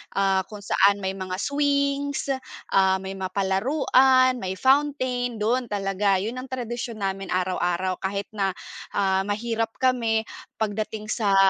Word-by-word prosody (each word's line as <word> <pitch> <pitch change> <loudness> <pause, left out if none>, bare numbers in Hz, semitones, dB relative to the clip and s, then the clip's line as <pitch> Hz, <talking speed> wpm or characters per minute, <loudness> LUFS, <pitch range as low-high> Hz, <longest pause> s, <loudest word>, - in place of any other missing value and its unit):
ah, 195 -1 +2
kung 205 0 -10
saan 200 0 +4
may 190 - 0
mga 185 -1 -5
swings, 280 +3 0 0.4
ah, 190 -1 +4
may 190 - -5
mga 190 -1 -4
palaruan, 255 +5 +3
may 190 0 -3
fountain. 260 -1 +1
Dun 235 +3 0
talaga, 195 -1 +1
yun 240 +4 -4
ang 255 - -7
tradisyon 240 -4 -5
namin 195 0 -2
araw-araw. 185 0 -1
Kahit 200 +2 -3
na, 195 -3 -1 0.4
ah, 195 0 +1
mahirap 225 +2 -2
kami 230 -4 +1 0.3
pagdating 215 0 -3
sa 205 -4 +2
210 Hz, 135 wpm, -25 LUFS, 195-255 Hz, 0.4 s, saan